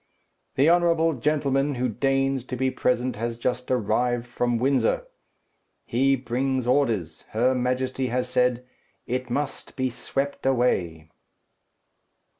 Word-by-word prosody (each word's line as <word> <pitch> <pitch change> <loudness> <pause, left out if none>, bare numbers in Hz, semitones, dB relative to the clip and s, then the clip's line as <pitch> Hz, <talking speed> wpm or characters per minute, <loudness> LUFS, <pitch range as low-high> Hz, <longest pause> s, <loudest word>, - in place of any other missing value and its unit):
"The 135 +3 +4
honourable 165 -1 +3
gentleman 140 0 0
who 125 +1 0
deigns 135 +2 0
to 130 - -5
be 130 +1 0
present 125 -1 0
has 115 +1 -3
just 125 +1 -2
arrived 120 0 +1
from 120 0 -1
Windsor. 140 - +1 0.8
He 135 +3 +2
brings 130 +1 -1
orders. 120 - 0
Her 125 +4 +3
Majesty 130 +1 -1
has 125 +1 -1
said, 125 0 +1 0.4
'It 125 +1 -3
must 140 +3 -3
be 130 -2 -1
swept 140 +3 -3
away.'" 90 -12 0
125 Hz, 120 wpm, -25 LUFS, 120-135 Hz, 0.8 s, The